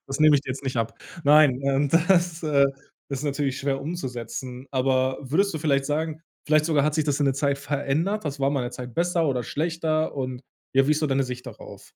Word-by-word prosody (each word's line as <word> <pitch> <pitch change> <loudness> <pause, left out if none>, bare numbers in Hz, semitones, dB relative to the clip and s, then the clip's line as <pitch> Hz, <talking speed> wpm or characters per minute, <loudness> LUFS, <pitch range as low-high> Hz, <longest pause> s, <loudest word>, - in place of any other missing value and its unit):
das 135 +2 -4
nehme 155 -1 +7
ich 140 - -2
dir - - -11
jetzt 135 +2 -5
nicht 130 -1 -3
ab. 115 0 -1 0.3
Nein 145 -3 +6
und 140 +1 +1 0.2
das, 175 -3 +2
äh, 140 -3 +4 0.4
ist 140 +1 -3
natürlich 140 -2 -1
schwer 135 -1 -1
umzusetzen, 130 -4 -6
aber 130 0 +1
würdest 170 +9 +1
du - - -2
vielleicht 140 -3 +1
sagen 155 +1 -2 0.3
vielleicht 155 0 +4
sogar 150 -4 +2
hat 150 - +1
sich 155 -1 +1
das 145 -2 0
in 145 - +2
der 135 - +2
Zeit 140 0 0
verändert? 150 +9 -1
Das 145 0 -4
war 135 0 +2
mal 140 -3 0
’ne 120 - -5
Zeit 125 -1 -8
besser 170 -1 +1
oder 125 -3 0
schlechter? 160 +2 -1
Und 130 -2 -4 0.3
ja, 135 0 +4
wie - - +2
ist 155 - +1
so 155 - +1
deine 135 0 +1
Sicht 125 -1 -7
darauf? - - -11
140 Hz, 225 wpm, -25 LUFS, 135-155 Hz, 0.4 s, nehme